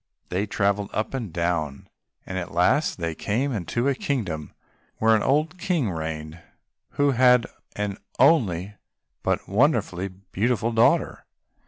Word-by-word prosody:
They 95 +4 -1
travelled 100 0 0
up 110 - -2
and 120 -8 -4
down, 85 -4 -2 0.4
and 95 0 -3
at 90 - -6
last 130 - +2
they 85 -2 -2
came 120 - -1
into 115 - -1
a 140 - +3
kingdom 100 - -3 0.5
where 110 0 +4
an 110 - +1
old 155 +6 +1
King 165 - 0
reigned 80 0 -5 0.5
who 145 0 +3
had 125 -1 +5 0.3
an 105 -1 -3 0.2
only 105 - +3 0.5
but - - -1
wonderfully 100 - +1
beautiful 100 +5 -2
daughter. 115 0 +2
105 Hz, 135 wpm, -25 LUFS, 90-125 Hz, 0.5 s, had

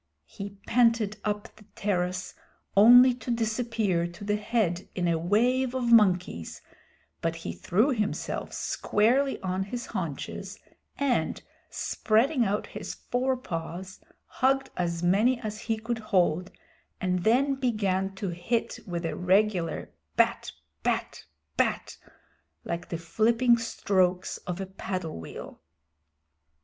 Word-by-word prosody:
He 200 0 -8
panted 230 -3 +3
up 210 +1 -3
the 215 - -16
terrace 180 -2 -1 0.4
only 245 +5 +8
to 245 0 -9
disappear 225 -6 0
to 175 +3 -11
the 205 0 +1
head 210 -5 -1
in 180 -2 0
a 165 -1 +1
wave 245 +8 +2
of 245 -2 0
monkeys, 180 - +3 0.6
but - - -1
he 85 - -5
threw 200 - +1
himself 215 -5 -2
squarely 255 +6 +1
on 185 0 -1
his 235 +4 -5
haunches, 170 -9 -5 0.4
and, 280 -3 0 0.3
spreading 245 +5 +1
out 205 0 0
his - - -7
forepaws, 190 -8 -3 0.3
hugged 270 +2 +1
as 170 -1 -2
many 215 +8 +3
as 215 -3 -5
he 225 -1 -1
could 225 +1 -3
hold, 180 -4 +1 0.5
and 180 -1 0
then 265 +5 +3
began 200 -7 0
to 195 0 -3
hit 175 +7 -2
with 170 -2 -3
a 165 - -2
regular 185 -1 +1 0.2
bat - - +2 0.3
bat - - -2 0.3
bat, - - 0 0.7
like 170 0 -4
the 170 - -2
flipping 230 +8 +3
strokes 185 -5 0
of 180 0 -3
a 195 - -3
paddle 185 - -5
wheel. 80 - -9
210 Hz, 125 wpm, -28 LUFS, 180-235 Hz, 0.7 s, only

